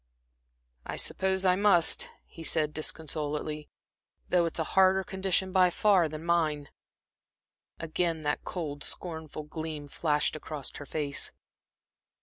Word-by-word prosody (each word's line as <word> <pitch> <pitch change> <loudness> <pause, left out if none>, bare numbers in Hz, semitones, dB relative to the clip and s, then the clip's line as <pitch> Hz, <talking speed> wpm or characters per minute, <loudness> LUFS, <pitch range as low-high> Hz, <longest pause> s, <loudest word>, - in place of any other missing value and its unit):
"I - - -5
suppose 190 0 0
I 180 -1 +5
must," 195 -4 +5 0.2
he 165 - -13
said, 155 -1 +1
disconsolately, 150 -1 -2 0.6
"though 175 -2 +3
it's 165 - -4
a 160 - +1
harder 190 0 +5
condition, 190 0 -1
by 185 -1 +5
far, 185 -3 +3
than 155 +2 -7
mine." 155 -4 +1 1.1
Again 165 0 -1
that 145 0 -1
cold, 150 -5 -5
scornful 160 -3 -5
gleam 155 -1 -6
flashed 150 0 0
across 150 -2 -6
her 145 - -9
face. 145 -2 -2
160 Hz, 125 wpm, -29 LUFS, 150-180 Hz, 1.1 s, I